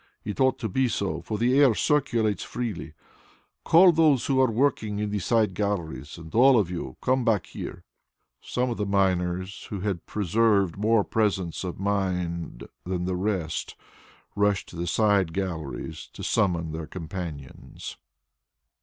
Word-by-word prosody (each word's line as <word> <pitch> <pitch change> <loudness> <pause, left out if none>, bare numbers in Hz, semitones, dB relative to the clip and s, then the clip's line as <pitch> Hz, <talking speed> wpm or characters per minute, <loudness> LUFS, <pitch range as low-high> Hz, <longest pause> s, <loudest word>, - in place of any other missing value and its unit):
It 105 - -5
ought 130 0 +3
to 115 - -3
be 130 +6 +1
so, 100 -4 -2
for 110 - -4
the 125 +5 +3
air 135 -6 +6
circulates 120 -8 +1
freely. 110 -10 -5 0.7
Call 180 +2 +7
those 155 -6 +3
who 130 -1 +3
are 130 - +4
working 110 -3 0
in 105 0 -2
the 105 - -1
side 110 +1 +2
galleries, 85 -9 -3
and 80 -1 -11
all 130 +2 +6
of 95 -5 +1
you 65 -7 -5
come 130 0 +2
back 110 -6 +2
here." - - -8 0.6
Some 125 0 -1
of 115 - -3
the 105 - -1
miners, 95 -1 0
who 100 -3 -4
had 95 -4 -3
preserved 105 -2 +2
more 105 +1 +3
presence 95 -7 -1
of 90 -1 -5
mind 90 -7 -2 0.2
than 90 -1 -2
the 90 0 -1
rest, 90 -4 -2 0.6
rushed 100 -1 +1
to - - -12
the 85 +1 -3
side 100 -3 +2
galleries 85 -7 -4
to - - -8
summon 85 -7 +1
their 80 0 -5
companions. 80 -5 -7
100 Hz, 155 wpm, -26 LUFS, 90-115 Hz, 0.7 s, Call